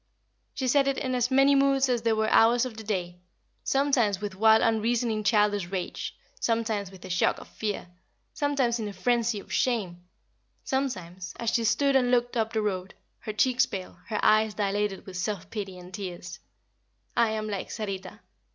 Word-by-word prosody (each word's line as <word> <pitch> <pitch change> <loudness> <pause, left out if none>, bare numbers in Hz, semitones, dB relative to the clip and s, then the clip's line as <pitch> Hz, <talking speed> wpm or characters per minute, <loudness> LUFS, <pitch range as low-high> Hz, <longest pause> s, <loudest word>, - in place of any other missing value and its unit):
She 260 - -2
said 275 +2 +3
it 275 -1 +1
in 260 -1 -2
as 245 -1 +1
many 270 +1 +5
moods 275 -1 +3
as 245 -2 +1
there 225 -1 +2
were 220 0 +1
hours 235 +2 +5
of 250 -3 -6
the 220 - -8
day. 180 -4 -3 0.4
Sometimes 270 -8 +2
with 205 -1 -4
wild 220 +3 +5
unreasoning 225 0 +1
childish 205 -3 +2
rage; 185 -1 -4 0.2
sometimes 225 -4 0
with 190 -1 -13
a - - -8
shock 175 - +2
of - - -11
fear; 210 -4 -4 0.5
sometimes 270 -5 0
in 215 - -3
a 205 - -6
frenzy 235 -1 +1
of - - -10
shame; 200 -9 0 0.6
sometimes, 185 -10 -3
as 230 -1 0
she 235 - +1
stood 270 +6 +2
and 250 -2 +4
looked 245 0 +1
up 225 -1 0
the 220 -2 0
road, 190 -2 -3 0.2
her 215 - -6
cheeks 255 +4 +3
pale, 185 -2 -7
her 215 -2 -2
eyes 215 -1 +4
dilated 205 -1 -1
with 185 -2 -7
self 190 0 -3
pity 195 -4 -5
and 180 +1 -12
tears. 180 -2 -6 0.8
"I 230 -1 +4
am 215 0 -3
like 200 -2 -4
Sarita! 195 -1 -5
220 Hz, 180 wpm, -27 LUFS, 195-245 Hz, 0.8 s, many